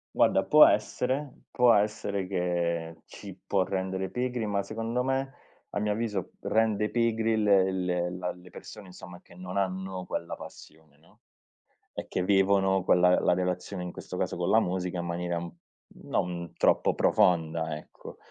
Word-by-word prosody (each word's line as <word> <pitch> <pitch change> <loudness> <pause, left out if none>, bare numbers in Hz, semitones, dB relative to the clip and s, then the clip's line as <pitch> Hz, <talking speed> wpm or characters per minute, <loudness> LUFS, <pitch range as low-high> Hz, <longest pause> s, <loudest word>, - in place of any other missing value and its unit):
Guarda - - +3
può - - +8
essere, 130 +3 -1
può 125 -1 +4
essere 100 -2 0
che 85 -3 -2
ci 100 -3 -10
può 95 -2 +2
rendere 95 0 -3
pigri, 125 -2 -2
ma 100 -1 0
secondo 115 +4 -3
me 135 +1 -1 0.4
a - - -2
mio 105 0 0
avviso 105 -4 -3
rende 110 -1 +1
pigri 115 -1 +1
le 95 -2 +4
le 90 -1 -1
la 90 0 -4
le 90 0 -14
persone 100 - -11
insomma 90 -1 -12
che - - -18
non 90 +2 -7
hanno 95 -1 -2
quella 85 -1 -4
passione, 75 -2 -14
no, 80 - -26 0.7
e - - -6
che 90 - -2
vivono 95 -1 +3
quella 90 0 +4
la - - +2
relazione 90 +1 -3
in 90 - -5
questo - - -8
caso - - -2
con 90 +1 -1
la 110 +2 +5
musica, 90 0 -2
in 85 - -3
maniera 85 0 -2 0.7
non 85 -1 -3
troppo - - +2
profonda 80 -2 +2
ecco. 75 - -12
95 Hz, 155 wpm, -28 LUFS, 90-105 Hz, 0.7 s, può